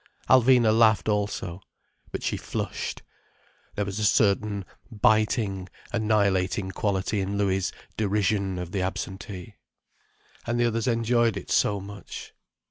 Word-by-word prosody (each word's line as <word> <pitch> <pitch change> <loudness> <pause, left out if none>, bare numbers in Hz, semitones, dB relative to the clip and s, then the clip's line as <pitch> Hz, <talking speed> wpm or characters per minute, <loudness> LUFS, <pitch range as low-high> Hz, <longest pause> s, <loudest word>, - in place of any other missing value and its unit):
Alvina 125 -3 +5
laughed 110 -2 +4
also. 105 -4 -1 0.5
But - - -5
she - - 0
flushed. - - -4 0.7
There 105 - -1
was 100 +1 -4
a - - -1
certain 100 -1 +2 0.2
biting, 105 -3 +1 0.2
annihilating 100 -4 +1
quality 100 0 -1
in 100 +1 -2
Louis' 95 -2 +1 0.3
derision 100 -2 +1
of 90 -1 -5
the 95 - -1
absentee. 95 +1 -5 0.9
And 120 0 0
the 120 - +4
others 115 0 0
enjoyed 115 -2 +2
it - - -7
so 100 -1 +2
much. 100 +1 -9
105 Hz, 125 wpm, -26 LUFS, 95-110 Hz, 0.9 s, Alvina